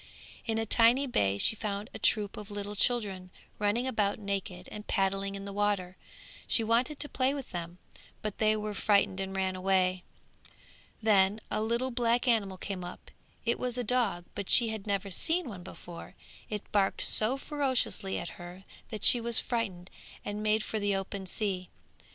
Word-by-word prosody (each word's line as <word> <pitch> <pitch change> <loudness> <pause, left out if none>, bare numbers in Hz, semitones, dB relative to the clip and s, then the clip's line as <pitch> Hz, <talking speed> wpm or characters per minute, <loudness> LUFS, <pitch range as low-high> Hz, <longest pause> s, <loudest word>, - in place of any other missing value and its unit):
In 225 -1 0
a 225 - -1
tiny 235 +5 +4
bay 100 - +1
she 220 - +4
found 205 -1 -4
a - - -7
troop 210 -2 +2
of 210 0 -8
little 205 0 -5
children 200 -5 +1 0.3
running 210 +4 +1
about 210 -6 0
naked 200 -2 -4
and 210 0 -9
paddling 195 0 0
in 195 0 -7
the 200 - -6
water; 200 -3 -1 0.5
she 230 - +3
wanted 240 +6 +1
to 295 - 0
play 265 0 0
with 275 -3 -7
them, 170 0 -6 0.5
but 215 -2 -4
they 215 0 +3
were 210 0 -4
frightened 200 -2 +2
and 195 0 -4
ran 190 -1 -1
away. 185 -1 +1 1.0
Then 205 -1 +4
a - - 0
little 235 +4 0
black 240 +1 +1
animal 205 -6 +1
came 185 -1 -5
up; 175 - -10 0.3
it 235 - 0
was 250 -1 -2
a 245 - -1
dog, 215 -7 0
but 200 -2 -5
she 235 -2 +7
had 220 -1 -6
never 200 -1 -1
seen 325 - 0
one 200 -6 -8
before; 175 -1 -11 0.3
it 210 -1 -4
barked 200 -2 +1
so 225 +5 +5
furiously 270 -9 0
at 170 - -4
her 175 +2 -10 0.3
that 215 -2 -6
she 240 - +9
was 235 0 +3
frightened 195 -7 -3 0.3
and 205 +1 -4
made 215 0 +1
for 220 - -3
the 205 -1 +1
open 195 0 -4
sea. 185 -2 -3
205 Hz, 180 wpm, -30 LUFS, 190-230 Hz, 1.0 s, she